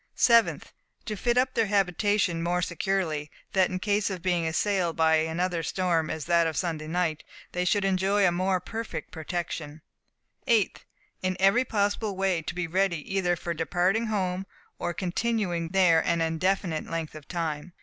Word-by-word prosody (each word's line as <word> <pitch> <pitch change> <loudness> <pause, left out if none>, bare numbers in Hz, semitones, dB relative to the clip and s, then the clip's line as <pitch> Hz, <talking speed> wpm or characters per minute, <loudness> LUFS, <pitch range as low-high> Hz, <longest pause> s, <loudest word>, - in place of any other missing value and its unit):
7th. 235 -2 +4 0.4
To 215 - -3
fit 240 +4 0
up 255 0 +2
their 225 -2 +2
habitation 195 -2 +1
more 175 +1 0
securely, 170 -4 -1 0.2
that 190 -2 +3
in 185 - -2
case 205 +2 0
of 185 -3 -5
being 175 -3 +1
assailed 175 0 0
by 160 -1 +4
such - - -4
another 175 +1 -1
storm 170 -2 0
as 155 -2 -4
that 170 -1 +3
of 160 - -3
Sunday 160 -4 -2
night, 160 -2 -1 0.3
they 180 - -1
should 200 +2 +2
enjoy 195 +1 +2
a 175 - +4
more 185 +1 +1
perfect 225 +4 -6
protection. 160 -2 -5 0.6
8th. 225 -5 +3 0.4
In 185 0 -1
every 195 +7 +4
possible 205 -1 0
way 190 -3 +1
to 160 - -6
be 180 -1 -1
ready 175 -1 -1
either 180 -2 +2
for 170 +1 -4
departing 180 +7 +1
home, 190 -3 -1 0.3
or - - -1
continuing 180 -2 -1
there 175 -3 +4
an 170 0 +1
indefinite 165 +1 0
length 165 -2 -3
of 155 -3 -11
time. 165 -1 -3
180 Hz, 170 wpm, -27 LUFS, 165-195 Hz, 0.6 s, 7th